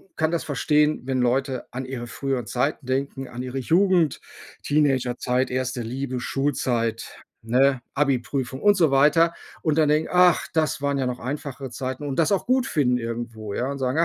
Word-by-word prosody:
kann 160 +1 0
das 170 - -1
verstehen, 150 0 +1
wenn 130 -1 0
Leute 130 +1 0
an 130 +1 -5
ihre 125 -2 -6
früheren 125 -1 -3
Zeiten 130 +2 -1
denken, 135 0 -2
an 125 +1 -6
ihre 130 +1 -4
Jugend, 170 +1 +2 0.4
Teenagerzeit, 130 -3 +1
1. 130 -1 -2
Liebe, 130 +2 -4
Schulzeit, 120 -4 -1 0.3
ne, 130 +2 +3
Abiprüfung 135 -1 -1
und 205 0 +5
so 165 -6 +3
weiter. 160 +5 +4 0.3
Und 155 -2 +1
dann 150 -2 +4
denken: 155 +1 +2
„Ach, 180 -2 +5
das 155 -3 +1
waren 140 -1 0
ja 130 - 0
noch 125 0 -3
einfachere 135 -1 -5
Zeiten“ 130 +3 -5
und 135 -2 -3
das 165 +4 +3
auch 195 - 0
gut 255 +1 +2
finden 125 -6 +2
irgendwo, 115 -2 -5
ja? 130 +3 -1
Und 140 - -5
sagen: 130 +4 0
135 Hz, 175 wpm, -24 LUFS, 125-150 Hz, 0.4 s, und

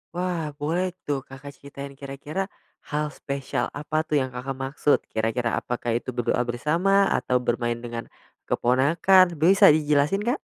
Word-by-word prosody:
Wah, 175 -3 -2
boleh 165 +5 0 0.2
tuh 140 -2 -1
Kakak 135 +2 -11
ceritain, 140 0 -9
kira-kira 140 +7 -5 0.4
hal 150 +1 0
spesial 135 -3 -3
apa 150 +1 -2
tuh 155 -1 0
yang 130 -2 -1
Kakak 130 +2 -5
maksud, 135 +2 +1
kira-kira 115 +1 0
apakah 120 -1 -2
itu 120 +2 -2
berdoa 120 -1 0
bersama, 170 +11 +2
atau 125 - +1
bermain 120 -1 -1
dengan 120 -1 -7 0.4
keponakan, 170 +8 +4
bisa 180 +6 +6
dijelasin, 150 +6 +2
Kak? 245 +5 0
140 Hz, 140 wpm, -25 LUFS, 125-160 Hz, 0.4 s, bisa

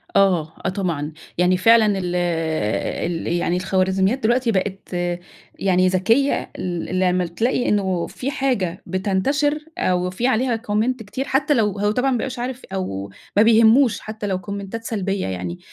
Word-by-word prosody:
آه، 175 -5 +3
آه، - - +2
طبعًا 170 -6 -2 0.3
يعني 180 +1 +3
فعلًا 215 +1 +5
ال 180 -1 -2
ال 165 -1 -1
يعني 175 0 0
الخوارزميات 190 +4 +1
دلوقتي 240 +1 +2
بقِت 195 0 -2 0.7
يعني 185 -1 +3
ذكية 225 +10 +2
ال 180 +1 -2
لمّا 180 -1 +2
تلاقي 235 +9 0
إنه 190 -4 0
في 270 +3 -4
حاجة 220 -11 -1
بتنتشِر 205 - 0 0.2
أو 180 0 +1
في 210 +7 -1
عليها 250 -1 +1
comment 220 +5 +2
كتير 215 +6 -4
حتى 280 +3 +2
لو 210 -6 +1
هو 205 +1 +2
طبعًا 255 +5 +1
ما 250 - +1
بيبقاش 255 +1 -4
عارف 250 +1 -4
أو 100 - -4 0.3
ما 210 - +7
بيهمّوش 225 +1 +5
حتى 215 -1 -6
لو 190 -2 -1
كومنتات 200 +4 -6
سلبية 200 -4 -2
يعني، 90 -2 -4
195 Hz, 155 wpm, -21 LUFS, 180-230 Hz, 0.7 s, ما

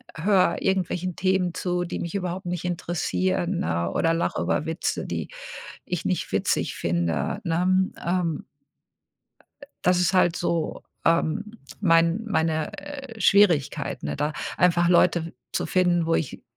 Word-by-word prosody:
höre 185 +1 +3
irgendwelchen 185 -2 -1
Themen 185 -2 +1
zu, 180 -1 -1
die 175 - -5
mich 170 +3 -4
überhaupt 180 -1 -3
nicht 180 0 -3
interessieren, 180 +1 -1
ne? 85 +1 -1
Oder 165 0 +2
lache 165 - -1
über - - 0
Witze, 160 +2 -2
die - - -4 0.6
ich 180 -2 -3
nicht 185 - -1
witzig - - 0
finde“, 85 - -1
ne? 185 +2 +2 0.2
Ähm 170 -4 0 1.2
Äh, - - -10 0.2
das 180 0 +3
ist 180 +2 +2
halt 175 -2 +4
so, 170 -2 -1 0.2
ähm, 165 +4 +2 0.4
mein 165 +2 +3
meine, 160 -6 0
äh, 275 -6 -8
Schwierigkeiten, 165 -10 +3
ne, - - -3
da 150 +1 -1 0.2
einfach 175 -1 +3
Leute 170 -1 +3 0.2
zu - - -1
finden, 175 -2 +2
wo 165 - +2
ich, 155 - -2
175 Hz, 140 wpm, -25 LUFS, 165-185 Hz, 1.2 s, halt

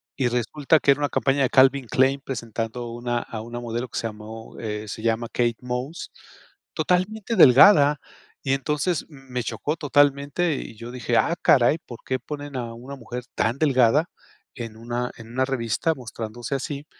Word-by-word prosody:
y 130 - +1
resulta 135 +6 +1
que 140 - +4
era 140 - +2
una 145 -1 0
campaña 140 0 +1
de 130 - +3
Calvin 135 -1 +4
Klein, 135 +1 +2
presentando 115 -1 -4
una 120 0 -2
a 110 -2 -7
una 120 +2 -6
modelo 120 +1 -4
que - - -7
se - - -2
llamó, 110 +1 -10
eh, 105 -1 -4
se 110 - -6
llama 115 +1 0
Kate 120 -1 +1
Moss, 125 +6 -5 0.6
totalmente 190 +7 0
delgada 145 - +7 0.4
y 135 - +1
entonces 150 +4 -1
me 135 -4 -6
chocó 150 +5 -3
totalmente, 145 +2 +2
y 110 - -7
yo 115 +2 -9
dije: 120 -2 -1
"Ah, 170 - +2
caray, 140 +4 +4
¿por 120 -6 -11
qué 130 0 -1
ponen 145 +1 -7
a 120 -2 -4
una 130 +4 -9
mujer 120 0 -7
tan 115 +4 0
delgada, 140 +2 +3 0.5
en 115 -3 -7
una 120 +2 -3
en 115 0 -12
una 130 +2 +1
revista 135 +5 -1
mostrándose 120 0 -6
así?", 140 +2 -4
125 Hz, 175 wpm, -24 LUFS, 115-145 Hz, 0.6 s, delgada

